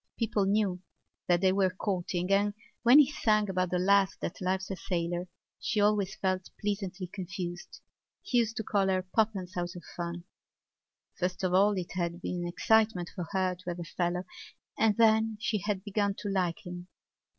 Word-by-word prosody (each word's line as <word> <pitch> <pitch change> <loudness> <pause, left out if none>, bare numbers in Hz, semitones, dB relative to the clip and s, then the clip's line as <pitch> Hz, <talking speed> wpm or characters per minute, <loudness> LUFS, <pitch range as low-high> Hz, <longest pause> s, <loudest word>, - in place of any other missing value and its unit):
People 215 -3 +1
knew 195 -3 +1 0.5
that 175 -1 +3
they 190 -1 +4
were 190 -1 +3
courting 180 -1 -2
and, 205 +1 +3 0.3
when 245 +3 +7
he 295 -1 +6
sang 215 -6 +2
about 185 -1 0
the 180 - 0
lass 195 +1 +3
that 170 - -5
loves 190 +1 -1
a - - -2
sailor, 175 0 -2 0.3
she 215 - -1
always 205 -1 +2
felt 185 -2 -1
pleasantly 195 -3 -3
confused. 180 -1 -6 0.4
He 245 - +2
used 225 0 0
to 220 - -1
call 200 -2 +1
her 185 -1 +1
Poppens 190 -1 -1
out 175 0 -3
of 175 - -9
fun. 170 0 -4 1.0
First 180 +1 -2
of 180 -1 +1
all 200 +3 +5
it 185 -3 -4
had 170 -1 -2
been 180 0 -3
an 175 - -2
excitement 215 0 +2
for 175 -3 -5
her 190 -2 +1
to 180 0 -8
have 175 0 -4
a - - -3
fellow 175 +2 -2 0.5
and 215 -2 +2
then 220 -1 +4
she 215 -1 0
had 195 0 -2
begun 205 -1 0
to 205 - -4
like 185 -4 -1
him. 175 0 -7
190 Hz, 185 wpm, -30 LUFS, 180-205 Hz, 1.0 s, when